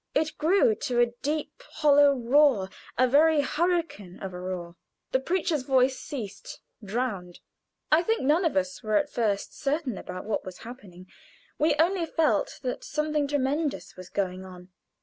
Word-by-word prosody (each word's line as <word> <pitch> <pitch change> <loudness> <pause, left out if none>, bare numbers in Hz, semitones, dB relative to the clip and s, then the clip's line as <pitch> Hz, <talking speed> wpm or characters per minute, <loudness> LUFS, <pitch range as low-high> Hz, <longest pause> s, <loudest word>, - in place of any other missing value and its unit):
It 310 +1 0
grew 395 +9 +4
to 255 - -2
a 240 -1 +3
deep, 300 - -3
hollow 290 -2 +5
roar 245 -5 +3 0.3
a 255 - +4
very 300 +3 +4
hurricane 315 - -1
of 190 -1 -6
a 180 - -6
roar. 180 -2 -5 0.4
The 260 - +2
preacher's 330 0 0
voice 260 0 +2
ceased, 240 -10 -7 0.2
drowned. 200 -5 -3 0.5
I 310 +2 +6
think 445 +1 0
none 305 +7 +3
of 325 - +1
us 185 0 -1
were 215 -1 -1
at 205 - +1
first 210 -4 -1
certain 275 -5 -2
about 185 +1 -7
what 215 -1 -2
was 185 -1 -9
happening; 200 -7 -11 0.5
we 305 0 +3
only 335 +2 +1
felt 305 -11 0
that 250 -1 -3
something 300 -1 -1
tremendous 290 +2 -1
was 185 -1 -11
going 185 -2 -2
on. 180 -1 -12
265 Hz, 160 wpm, -27 LUFS, 200-305 Hz, 0.5 s, I